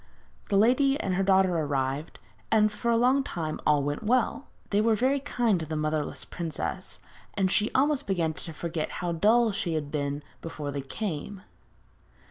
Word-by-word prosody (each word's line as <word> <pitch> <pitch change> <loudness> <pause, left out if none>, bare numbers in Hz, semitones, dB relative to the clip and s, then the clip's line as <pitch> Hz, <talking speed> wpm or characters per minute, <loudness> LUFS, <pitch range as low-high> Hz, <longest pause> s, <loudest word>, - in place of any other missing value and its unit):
The 200 - +3
lady 265 +6 +4
and 190 - -1
her 185 - +1
daughter 190 -2 +3
arrived, 140 -1 -2 0.3
and 215 -1 +4
for 235 +3 -3
a 230 - +4
long 255 +4 +3
time 160 - -4
all 150 -2 +4
went 145 +1 -2
well. 245 +4 +1 0.2
They 205 +1 +3
were 225 0 +3
very 265 +5 +2
kind 240 -8 +1
to 160 - -4
the 155 - -3
motherless 155 0 -2
princess, 165 -4 -4 0.4
and 190 -2 +1
she 210 +2 +2
almost 285 +1 +2
began 170 -5 0
to 165 - -8
forget 160 0 -4
how 175 - 0
dull 220 +7 +4
she 195 -5 -2
had 145 -2 -3
been 145 -1 -2 0.2
before 150 -3 -5
they 140 0 -3
came. 190 +5 -5
190 Hz, 175 wpm, -27 LUFS, 155-225 Hz, 0.4 s, lady